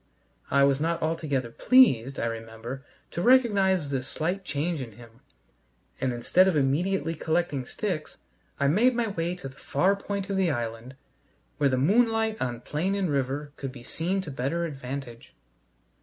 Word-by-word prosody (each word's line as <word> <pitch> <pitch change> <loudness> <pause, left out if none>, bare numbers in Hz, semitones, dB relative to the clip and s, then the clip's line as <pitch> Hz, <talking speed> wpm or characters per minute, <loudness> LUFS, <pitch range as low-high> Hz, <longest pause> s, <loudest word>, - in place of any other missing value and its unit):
I 140 0 +4
was 140 0 +3
not 165 +2 0
altogether 150 -7 -1
pleased, 135 - +4
I - - 0
remember, 115 +3 -6 0.3
to 170 - -3
recognize 195 - +4
this 135 -1 -2
slight 180 +5 -2
change 155 0 -2
in 115 -4 -7
him, 115 +2 -16 0.8
and 130 - 0
instead 150 +10 +3
of 185 - +2
immediately 160 +4 +1
collecting 160 -4 -1
sticks, 180 -8 -4 0.4
I 140 - +3
made 230 - +4
my 230 -2 0
way 175 -2 -2
to 180 -6 -8
the 130 0 -13
far 185 +8 +1
point 200 -1 -4
of 195 - 0
the 190 -3 +2
island 120 -1 -4 0.6
where 140 - +3
the 130 - +1
moonlight 220 - +2
on 120 -2 -2
plain 180 +7 -1
and 190 -5 0
river 140 +1 -2
could 135 -2 -5
be 125 -2 -12
seen 180 +9 -2
to 160 - -7
better 140 +6 -1
advantage. 135 -5 -7
150 Hz, 165 wpm, -27 LUFS, 130-190 Hz, 0.8 s, I